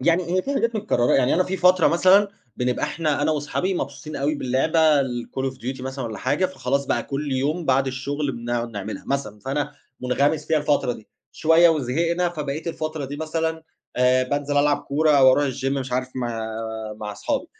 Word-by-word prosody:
يعني 170 +6 +2
هي 185 - +2
فيه 280 - -3
حاجات 230 -3 0
متكرّرة، 200 - +1
يعني 125 - +3
أنا 185 - +3
فيه 190 +1 -3
فترة 180 -1 +5
مثلًا 185 +4 +5 0.3
بنبقى 125 0 0
إحنا 150 -1 -1
أنا 155 - +2
واصحابي 155 +5 -1
مبسوطين 155 -2 -5
أوي 145 +3 0
باللعبة 150 +3 +3
الCall 130 +1 -3
of - - -15
Duty 130 +1 -5
مثلًا 130 0 -5
والَّا 110 -2 -5
حاجة، 145 +8 +1
فخلاص 140 -6 -2
بقى 120 - 0
كُلّ 140 +2 -4
يوم 145 +6 -1
بعد 135 -1 +2
الشغل 140 +2 -2
بنقعد 120 0 -3
نعملها 105 -1 -6
مثلًا، 135 -7 -2
فأنا 145 +5 -2 0.3
مُنغمِس 140 +4 +1
فيها 155 - +2
الفترة 145 -4 +1
دي، 110 - -12 0.2
شوية 165 +2 +5
وزهقنا، 165 +5 +1
فبقيت 155 -1 -5
الفترة 155 -2 -4
دي 145 +2 -6
مثلًا، 160 +1 -2 0.3
آآ، 125 +1 +4
بانزل 145 +2 -2
ألعب 145 0 +4
كورة 155 +2 +1
أو 135 -3 +7
أروح 145 - +2
الgym 130 +1 -7
مش 135 -2 -3
عارف 125 0 -1
مع 120 -3 -3 0.5
مع 105 -1 -6
اصحابي، 275 - -2
145 Hz, 190 wpm, -23 LUFS, 130-160 Hz, 0.5 s, أو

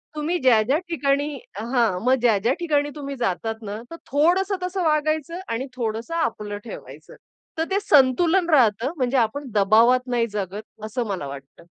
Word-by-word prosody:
तुम्ही 315 +4 -1
ज्या-ज्या 250 +2 +4
ठिकाणी 285 -2 0 0.2
हां, 230 -4 0
मग 255 +1 +4
ज्या-ज्या 230 +1 +3
ठिकाणी 290 -4 +1
तुम्ही 280 -1 -6
जातात 225 -1 -2
ना, 210 +1 -6
तर - - -6 0.2
थोडंसं 360 +7 +2
तसं 365 0 -2
वागायचं 310 +2 0
आणि 230 +4 -2
थोडंसं 230 +5 -3
आपलं 210 -10 -2
ठेवायचं. 235 - -11 0.4
तर 320 - +1
ते 395 - +2
संतुलन 335 +4 +3
राहतं 245 -2 +3
म्हणजे 255 0 +1
आपण 260 +4 0
दबावात 230 +5 +4
नाही 240 -2 +1
जगत 205 +1 -4 0.2
असं 235 +2 -3
मला 185 -8 -3
वाटतं. 140 +3 -11
255 Hz, 155 wpm, -23 LUFS, 220-305 Hz, 0.4 s, ज्या-ज्या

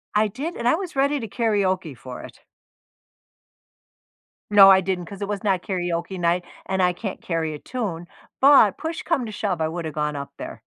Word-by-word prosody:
I 215 +1 +4
did, 280 - -5
and 235 - -2
I 250 - +5
was 360 -1 -6
ready 280 +2 +2
to 225 - -5
karaoke 190 - 0
for 125 +2 -9
it. - - -12 2.1
No, 200 -2 +9
I 190 0 +7
didn't 185 -1 -2
'cause 200 +2 -9
it 200 - -2
was 205 -2 -3
not 190 -4 +1
karaoke 175 -1 -3
night, 175 +1 +1 0.2
and 190 0 0
I 180 0 +3
can't 195 0 -6
carry 165 -3 -2
a - - -6
tune, 195 -9 -4 0.3
but 270 -7 +6
push 320 +1 -4
come 335 -7 0
to - - -6
shove, 200 -5 -2
I 160 - +1
woulda 165 -1 -4
gone 150 0 -2
up 140 0 -6
there. - - -8
190 Hz, 195 wpm, -23 LUFS, 170-225 Hz, 2.1 s, No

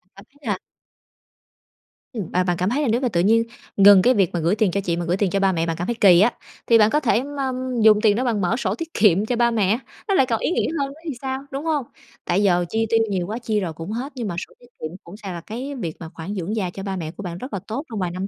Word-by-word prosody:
cảm 195 +1 -14
thấy 285 - -28
là 210 -8 -2 1.5
Ừm, 210 -8 -4
và 185 - +3
bạn 175 -1 0
cảm 180 +3 0
thấy 270 +6 0
là 290 - 0
nếu 235 +2 +1
mà 255 - +1
tự 170 -5 +1
nhiên 225 +5 +4 0.3
ngừng 200 -1 +8
cái 250 +6 +4
việc 195 -7 +2
mà 175 - 0
gửi 170 +5 +1
tiền 210 -3 +2
cho 200 +3 -1
chị 170 -3 -1
mà 175 - -2
gửi 175 +2 0
tiền 200 -1 +1
cho 195 - 0
ba 195 -1 +3
mẹ, 165 -2 0
bạn 165 -1 -2
cảm 175 - -3
thấy 235 - -1
kỳ 180 -4 +7
á, 230 +4 +4 0.3
thì 230 - +6
bạn 215 -1 +5
có 300 - +2
thể 240 -4 +1
ma 280 -2 -3 0.3
dùng 215 -1 +6
tiền 210 -2 +4
đó 245 - 0
bạn 230 -5 0
mở 185 +5 +1
sổ 200 -6 -1
tiết 330 +6 -7
kiệm 205 -1 +4
cho 245 - -1
ba 235 0 +3
mẹ, 215 0 +1 0.3
nó 400 - +1
lại 270 -9 +4
còn 230 -3 -1
ý - - -1
nghĩa - - +1
hơn 280 - 0
nữa 280 +3 -12
thì 315 - -2
sao, 265 0 -3
đúng 275 +3 -4
hông? 300 -5 0 0.4
Tại 185 +4 +1
giờ 175 -3 +3
chi 225 0 0
tiêu 225 0 +3
nhiều 185 -3 -1
quá, 215 +3 -3
chi 220 -3 -1
rồi 175 -5 -3
cũng 165 +5 -7
hết, 250 +6 -4
nhưng 240 -4 -3
mà 175 - -4
sổ - - -22
tiết 245 - -18 0.2
kiệm 155 +3 -5
cũng 175 +4 -11
sẽ 210 -2 -10
là 170 -1 -6
cái 255 +9 -6
việc 170 -11 -4
mà 165 - -8
khoản 170 +4 -6
dưỡng 190 +3 -3
già 195 -5 -1
cho 195 +2 -8
ba 195 -1 -3
mẹ 160 -4 -4
của 185 - -9
bạn 175 -2 -5
rất 255 +7 -8
là 200 - -2
tốt 235 +6 -3
trong 220 -3 -4
vài 180 -2 -1
năm 185 +2 -4
210 Hz, 310 wpm, -22 LUFS, 180-240 Hz, 1.5 s, ngừng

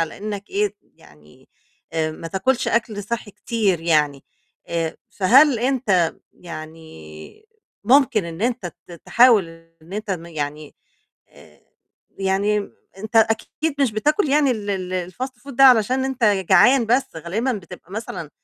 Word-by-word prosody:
على 165 -1 -2
إنك 205 0 -6
إيه 410 +1 -1
يعني، - - -22 0.5
ما 160 +1 -3
تاكُلش 235 +8 0
أكل 220 -3 -1
صحي 215 +1 -5
كتير 205 -5 -1
يعني 150 -4 +1 0.4
آآ 165 -1 -3
فهل 255 +7 +4
أنت 225 -9 +1 0.2
يعني 155 - -11 0.4
ممكن 250 -4 +4
إن 170 +4 -7
أنت 245 -4 -1 0.2
ت 175 - -12
تحاول 230 -7 +5 0.3
إن 170 +4 -15
أنت 215 +1 -5 0.2
يعني، 150 -2 -6 0.5
آآ - - -20 0.6
يعني 200 +2 0 0.3
أنت 215 +3 -4
أكيد 225 +7 +1
مش 260 -6 +2
بتاكل 300 - +1
يعني 285 0 +3
ال 210 -3 -4
ال 185 -2 -3
الfast 255 +7 -4 0.2
food 280 - -10
ده 270 +2 +5
علشان 255 +1 +5
أنت 265 -3 -1
جعان 210 +5 +4
بس 245 -4 0
غالبا 205 +11 -2
بتبقى 190 -3 -10
مثلًا 205 -8 -6
205 Hz, 135 wpm, -21 LUFS, 170-245 Hz, 0.6 s, تحاول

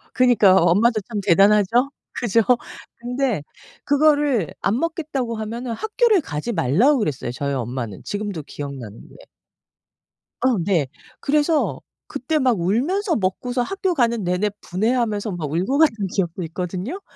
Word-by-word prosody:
그니까 230 -7 +5
엄마도 210 +6 +3
참 210 +1 -5
대단하죠? 205 +6 +4 0.3
그죠? 230 -1 +2 0.5
근데 245 - -2 0.4
그거를 285 - +2
안 210 +5 +1
먹겠다고 305 -8 -2
하면은 230 +3 -5
학교를 435 - +2
가지 150 - -4
말라고 200 - +3
그랬어요, 145 - -2
저희 140 +3 -3
엄마는. 120 -5 -4
지금도 205 -6 -4
기억나는 135 -8 -8
게. - - -17 1.1
어 255 -2 +2
네. 170 -7 +1 0.3
그래서 300 +2 +1 0.3
그때 280 +2 -2
막 255 -8 +2
울면서 315 - 0
먹고서 245 +6 -1
학교 385 +5 -1
가는 235 -5 +1
내내 180 +4 0
분해하면서 215 +1 -1
막 160 -5 -4
울고 185 - 0
갔던 225 -11 +3
기억도 180 -2 -1
있거든요. 180 - -5
220 Hz, 310 characters per minute, -21 LUFS, 180-265 Hz, 1.1 s, 그니까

